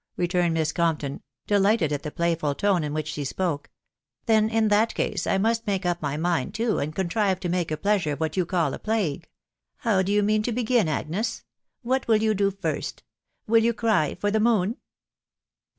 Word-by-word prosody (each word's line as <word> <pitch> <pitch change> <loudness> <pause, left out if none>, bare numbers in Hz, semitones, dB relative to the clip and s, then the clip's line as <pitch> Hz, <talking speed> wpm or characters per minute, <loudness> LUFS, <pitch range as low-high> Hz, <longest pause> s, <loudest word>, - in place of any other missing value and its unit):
*' - - -50
returned 175 -1 +1
Miss 160 -1 +1
Compton, 155 -5 -1 0.2
delighted 205 -5 +2
at 145 - -2
the 150 - -5
playful 165 -3 -1
tone 195 -3 +1
in 150 - -3
which 155 0 -3
she 150 -2 -4
spoke; 150 +1 -2 0.3
" - - -54
then, 220 -2 +3
in 220 -1 +2
that 215 +2 +2
case, - - -1
I - - +2
must 225 +3 0
make 195 -2 -1
up 175 -1 0
my 145 -1 -2
mind 175 +4 -1
too, 225 0 0
and 150 +2 -3
contrive 190 +1 0
to 175 - -2
make 175 -1 0
a 155 - -2
pleasure 195 -4 +1
of 145 - -7
what 160 -1 -2
you 185 - +2
call 170 -5 0
a - - -6
plague. 190 -8 -2 0.5
How 215 -6 +1
do 190 +1 -1
you 205 0 +3
mean 215 +1 +2
to 240 - -2
begin, 235 -3 +1
Agnes?.... 160 +8 -2 0.4
What 260 +2 0
will 225 -2 +5
you 220 -1 +3
do 200 -1 +2
first?.... 195 0 -4 0.4
Will 225 +1 +4
you 235 0 +2
cry 220 -10 +1
for 205 - 0
the 220 - +2
moon 220 -1 +2
190 Hz, 210 wpm, -25 LUFS, 160-215 Hz, 0.5 s, will